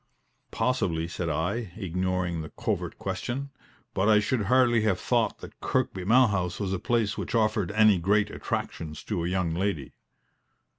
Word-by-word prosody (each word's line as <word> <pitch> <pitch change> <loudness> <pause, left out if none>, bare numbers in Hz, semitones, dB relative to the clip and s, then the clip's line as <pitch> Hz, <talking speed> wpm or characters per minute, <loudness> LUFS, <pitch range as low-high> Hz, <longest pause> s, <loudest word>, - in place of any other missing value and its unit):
"Possibly," 95 -10 0
said 85 0 -3
I, 90 +6 -2
ignoring 90 -3 -1
the 80 - -7
covert - - -3
question; 140 +3 -4 0.4
"but 95 +3 +2
I 105 -1 +6
should 105 +1 0
hardly 125 -1 +4
have 100 -4 +1
thought - - 0
that - - -11
Kirkby 95 -1 -1
Malhouse 100 -6 +3
was 95 -2 -1
a 95 - -1
place 110 0 0
which - - -3
offered 110 -4 +1
any 110 -3 +5
great 105 +4 +2
attractions 80 -2 -4
to 95 -6 -2
a - - -1
young 90 -3 0
lady." 85 -6 -2
100 Hz, 155 wpm, -27 LUFS, 90-110 Hz, 0.4 s, I